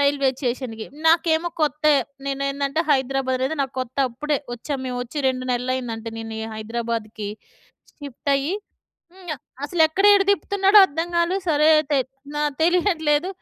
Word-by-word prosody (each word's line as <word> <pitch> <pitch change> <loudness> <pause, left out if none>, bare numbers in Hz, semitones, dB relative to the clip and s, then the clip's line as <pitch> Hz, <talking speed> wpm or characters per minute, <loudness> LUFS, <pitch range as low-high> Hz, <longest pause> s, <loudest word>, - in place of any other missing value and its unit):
రైల్వేచేషన్‌కి. 260 -5 -1 0.2
నాకేమో 325 0 +3
కొత్తె. 305 0 +3 0.3
నేనేందంటే 275 +1 -1
హైదరాబాద్ 265 -1 +1
అనేది 265 +5 -1
నాకు 265 - -5
కొత్త. 255 0 -6 0.2
ఇప్పుడే 300 +5 -1 0.2
వచ్చాము. 270 +3 -5
మేము 250 -1 -3
వచ్చి 250 +5 -7
2 255 0 -2
నెలలు 250 +1 -1
అయిందంటే 230 -3 -5
నేను 225 0 -6
ఈ - - -3
హైదరాబాద్‌కి. 220 -1 -4 0.7
షిఫ్ట్ 285 0 -5
అయ్యి 280 +7 0 0.6
హ్మ్. 370 -2 -15 0.4
అసలు 325 +4 -3
ఎక్కడ 375 +6 -1
ఏడ 400 - +5
తిప్పుతున్నాడో 400 0 +4
అర్థంకాలే. 340 +3 -1
సరే 300 0 +4
అయితే 295 -2 +1 0.4
న - - -2 0.2
తెలియట్లేదు. 335 -2 +2
280 Hz, 135 wpm, -22 LUFS, 250-320 Hz, 0.7 s, ఏడ